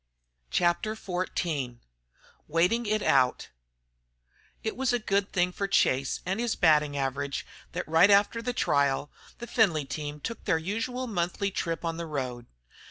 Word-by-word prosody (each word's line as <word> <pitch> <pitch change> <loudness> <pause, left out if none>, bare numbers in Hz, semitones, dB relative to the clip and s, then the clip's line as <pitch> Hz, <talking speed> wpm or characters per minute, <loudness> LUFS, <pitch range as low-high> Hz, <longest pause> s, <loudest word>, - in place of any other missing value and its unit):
CHAPTER 175 +5 +1
XIV 175 - -3 0.7
WAITING 180 +9 +2
IT 215 0 +1
OUT 130 -2 +2 1.1
It 220 - -2
was 265 0 +1
a 245 - +2
good 200 -3 0
thing 180 -1 +1
for 200 +2 -2
Chase 135 -8 +2
and 190 +4 -1
his 235 -1 0
batting 150 -4 +3
average 140 +1 -2 0.3
that 180 +2 -3
right 165 +5 +5
after 205 +3 +4
the 245 +2 -2
trial, 140 - +1 0.3
the 240 - -7
Findlay 180 - +2
team 150 +1 -5
took 230 +9 -6
their 160 - +3
usual 225 +9 -3
monthly 195 -2 -1
trip 165 -2 -3
on 165 0 -2
the 170 -1 -4
road. 125 -5 -4
175 Hz, 150 wpm, -28 LUFS, 145-215 Hz, 1.1 s, right